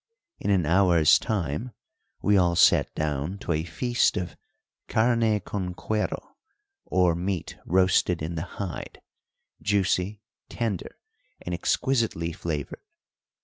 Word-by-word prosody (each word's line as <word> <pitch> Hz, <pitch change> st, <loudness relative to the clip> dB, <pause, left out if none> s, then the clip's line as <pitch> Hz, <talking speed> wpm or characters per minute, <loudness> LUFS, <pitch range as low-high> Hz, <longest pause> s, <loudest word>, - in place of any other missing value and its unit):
In -, -, -2 dB
an 95 Hz, -5 st, +3 dB
hour's 85 Hz, -2 st, +5 dB
time 105 Hz, -, -2 dB, 0.5 s
we 105 Hz, -, +4 dB
all 90 Hz, -3 st, +3 dB
sat 90 Hz, -, +5 dB
down 75 Hz, +4 st, -2 dB
to 100 Hz, -, -4 dB
a 80 Hz, -1 st, 0 dB
feast 120 Hz, +8 st, +1 dB
of 90 Hz, -3 st, -4 dB, 0.5 s
carne 115 Hz, -2 st, +2 dB
con 90 Hz, -2 st, -4 dB
cuero, 110 Hz, +3 st, -2 dB, 0.6 s
or 90 Hz, -2 st, +3 dB
meat 90 Hz, +1 st, -3 dB
roasted 90 Hz, -2 st, +3 dB
in 80 Hz, +2 st, -3 dB
the 80 Hz, -, -3 dB, 0.2 s
hide, 95 Hz, -6 st, -5 dB, 0.6 s
juicy, 100 Hz, +1 st, 0 dB, 0.3 s
tender, 110 Hz, -7 st, -3 dB, 0.5 s
and 90 Hz, -, -4 dB
exquisitely 90 Hz, -2 st, 0 dB
flavoured. 80 Hz, -4 st, -4 dB
90 Hz, 115 wpm, -26 LUFS, 85-105 Hz, 0.6 s, hour's